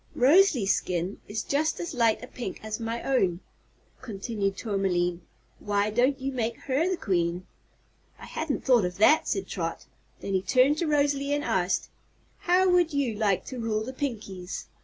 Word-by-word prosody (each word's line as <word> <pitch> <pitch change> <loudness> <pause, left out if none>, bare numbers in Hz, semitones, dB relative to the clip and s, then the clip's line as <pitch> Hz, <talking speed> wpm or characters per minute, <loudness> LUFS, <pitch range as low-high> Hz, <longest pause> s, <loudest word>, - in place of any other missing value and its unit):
"Rosalie's 270 - +5
skin 180 +2 -3
is 220 +2 -3
just 310 +3 0
as 340 -2 -4
light 230 -3 +2
a - - -7
pink 240 -7 -6
as 215 +1 -4
my 230 +1 -4
own," 190 -10 +1 0.6
continued 200 -3 -3
Tourmaline. 180 -4 -1 0.4
"Why 205 0 0
don't 255 +5 +2
you 270 +1 -3
make 235 -3 -2
her 285 +6 0
the 375 - -1
Queen?" 175 - -1 0.7
"I - - -11
hadn't 315 -3 -3
thought 245 -5 +5
of 180 0 -3
that," 295 +10 +5
said - - -1
Trot. - - -4 0.3
Then 195 - -4
she 190 - +2
turned 260 +8 +3
to 340 - 0
Rosalie 285 -1 +1
and 290 - -2
asked: 185 -6 0 0.5
"How 365 +2 +3
would 355 -3 +3
you 270 -5 +1
like 205 -3 0
to 255 - -7
rule 220 -2 -1
the 260 +4 -6
Pinkies?" 205 -9 -5
230 Hz, 170 wpm, -27 LUFS, 195-280 Hz, 0.7 s, Rosalie's